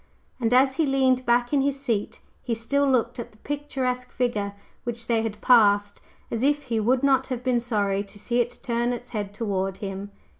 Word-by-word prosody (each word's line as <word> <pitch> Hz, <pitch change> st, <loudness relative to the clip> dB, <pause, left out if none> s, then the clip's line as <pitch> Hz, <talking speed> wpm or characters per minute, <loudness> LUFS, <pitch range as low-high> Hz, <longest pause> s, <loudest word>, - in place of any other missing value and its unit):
And 230 Hz, -2 st, 0 dB
as 265 Hz, +2 st, +4 dB
he 320 Hz, -, +3 dB
leaned 260 Hz, -2 st, +2 dB
back 240 Hz, +2 st, +2 dB
in 280 Hz, -, +4 dB
his 275 Hz, 0 st, 0 dB
seat, 230 Hz, -7 st, -2 dB, 0.2 s
he 235 Hz, -2 st, -2 dB
still 280 Hz, +5 st, +1 dB
looked 245 Hz, 0 st, +1 dB
at 235 Hz, -, -6 dB
the 215 Hz, -, -22 dB
picturesque 255 Hz, -2 st, -3 dB
figure 210 Hz, -5 st, -1 dB, 0.3 s
which 235 Hz, -1 st, -4 dB
they 230 Hz, -2 st, +1 dB
had 215 Hz, -2 st, -4 dB
passed, 205 Hz, -4 st, +4 dB, 0.3 s
as 230 Hz, -, -2 dB
if 290 Hz, +2 st, +2 dB
he 230 Hz, -3 st, -1 dB
would 250 Hz, +5 st, +2 dB
not 265 Hz, -1 st, +3 dB
have 250 Hz, -2 st, -4 dB
been 250 Hz, -2 st, +2 dB
sorry 205 Hz, -4 st, 0 dB
to 200 Hz, -, -13 dB
see 240 Hz, +4 st, -1 dB
it 240 Hz, 0 st, -1 dB
turn 240 Hz, 0 st, 0 dB
its 245 Hz, 0 st, -7 dB
head 205 Hz, -4 st, -4 dB
toward 195 Hz, -3 st, -2 dB
him. 195 Hz, 0 st, -5 dB
240 Hz, 200 wpm, -25 LUFS, 215-260 Hz, 0.3 s, as